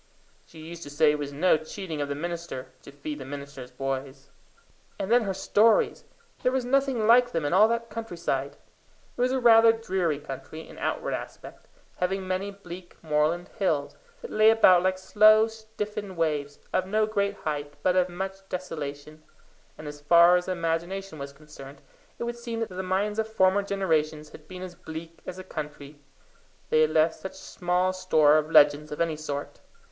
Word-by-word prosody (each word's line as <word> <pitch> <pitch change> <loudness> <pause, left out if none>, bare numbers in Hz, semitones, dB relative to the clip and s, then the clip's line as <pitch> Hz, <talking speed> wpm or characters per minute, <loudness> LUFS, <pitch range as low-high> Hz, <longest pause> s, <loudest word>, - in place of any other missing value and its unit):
She 165 - -16
used 165 +2 -9
to 145 - -8
say 150 +1 +3
it 150 - -2
was 145 -1 -4
no 160 +4 +3
cheating 160 0 -6
of 145 - -3
the 140 - -2
minister 170 -4 -5
to - - -12
feed 145 +1 -7
the - - -6
minister's 140 -2 -8
boys. 135 +1 -5 0.7
And 195 - -4
then 240 -1 +4
her 195 - -1
stories! 215 +3 +2 0.4
There 250 - +2
was 260 -1 -1
nothing 265 -3 +1
like 240 +2 +5
them 165 -7 -1
in 145 - 0
all 205 +4 +6
that 230 0 -2
countryside. 170 -11 -3 0.6
It - - -4
was 250 +1 +2
rather 230 -3 +6
a - - +6
dreary 185 -8 -1
country 150 +3 -9
in - - -12
outward - - -2
aspect, - - -8 0.3
having 190 +1 -2
many 185 +2 -2
bleak 180 -3 -11
moorland 155 +3 0
hills, 155 -8 0 0.3
that 480 - -7
lay 215 +1 +5
about 185 -5 +6
like 185 +1 +1
slow 215 +3 +5
stiffened 210 -3 -6
waves, 150 -3 -1 0.2
of 185 0 +1
no 215 +2 +2
great 200 -1 -1
height 145 -4 -4
but 185 - +3
of 185 0 +3
much 190 +2 -5
desolation; 155 -4 -6 0.6
and 155 - -9
as 145 0 -8
far 170 +3 +6
as 180 0 0
the 185 - 0
imagination 170 +1 -3
was 140 0 -6
concerned, 140 -1 -13 0.4
it - - -4
would 235 0 -4
seem 235 -1 -5
that 225 - -2
the 185 0 -5
minds 195 +3 -1
of 220 - 0
former 190 -1 +3
generations 160 -6 -1
had 155 - -14
been 185 +1 -8
as 185 -1 -7
bleak 165 0 -9
as 185 - -6
the 185 - -7
country, 150 -4 -8 0.7
they 155 - +4
had 155 - +4
left 160 +1 +3
such 190 0 -9
small 180 0 -1
store 155 -5 +4
of 155 0 -4
legends 150 -1 +5
of 150 - -6
any 165 -2 0
sort. 145 -2 -6
175 Hz, 185 wpm, -26 LUFS, 150-200 Hz, 0.7 s, all